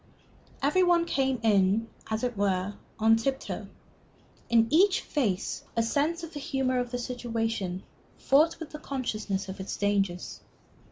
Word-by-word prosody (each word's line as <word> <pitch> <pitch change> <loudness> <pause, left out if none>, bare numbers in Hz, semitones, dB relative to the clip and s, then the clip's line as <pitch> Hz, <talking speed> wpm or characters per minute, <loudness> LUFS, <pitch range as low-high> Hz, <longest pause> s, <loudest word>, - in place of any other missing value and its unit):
Every 300 +7 +3
one 350 -1 +4
came 265 -5 0
in, 205 +1 +3 0.2
as 220 +2 -2
it 245 -2 -1
were, 195 -1 0 0.2
on 225 +1 +5
tiptoe. 265 +4 -3 0.8
In 230 -1 +5
each 370 +5 +5
face 210 -11 -1
a 230 - +4
sense 305 +8 0
of 335 - -7
the 295 - -5
humor 265 -2 0
of 245 -1 -2
the 245 - -3
situation 225 -6 -3 0.3
fought 310 +4 +3
with 320 -2 -7
the 300 - -7
consciousness 215 -9 -3
of 190 +1 -7
its 190 - -4
dangers. 195 -3 -1
235 Hz, 150 wpm, -28 LUFS, 205-280 Hz, 0.8 s, on